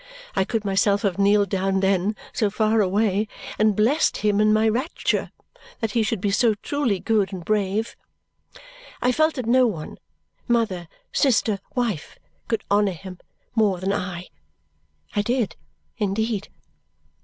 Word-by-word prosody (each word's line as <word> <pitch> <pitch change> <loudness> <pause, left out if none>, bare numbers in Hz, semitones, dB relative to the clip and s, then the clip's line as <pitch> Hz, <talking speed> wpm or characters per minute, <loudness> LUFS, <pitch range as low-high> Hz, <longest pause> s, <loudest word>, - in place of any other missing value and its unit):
I 190 - +2
could 220 -1 -2
myself 200 +1 +2
have 200 -2 0
kneeled 200 0 +4
down 195 0 0
then, 195 +2 +1 0.2
so 210 - +1
far 215 +1 +2
away, 205 +1 +1 0.3
and 215 -1 +4
blessed 240 +10 +2
him 210 -1 +2
in 215 0 +4
my 215 +1 +3
rapture 250 +9 -1 0.5
that 225 -3 -1
he 235 - +2
should 220 -1 0
be 200 +1 0
so 225 +1 +3
truly 240 -2 -1
good 210 -2 +1
and 180 -3 -7
brave. 210 +2 0 1.0
I 250 - +2
felt 310 +4 +2
that 255 -4 -3
no 250 +2 +4
one 165 -9 -6 0.5
mother, 220 -8 0 0.3
sister, 225 -6 +2 0.2
wife 230 - -2 0.3
could 225 -2 -1
honour 205 -1 +3
him 180 +2 -10 0.3
more 210 -5 +2
than 190 +2 -1
I. 180 -2 -4 0.9
I 205 - +3
did, 235 -4 -1 0.4
indeed! 210 0 -1
210 Hz, 145 wpm, -23 LUFS, 195-225 Hz, 1.0 s, kneeled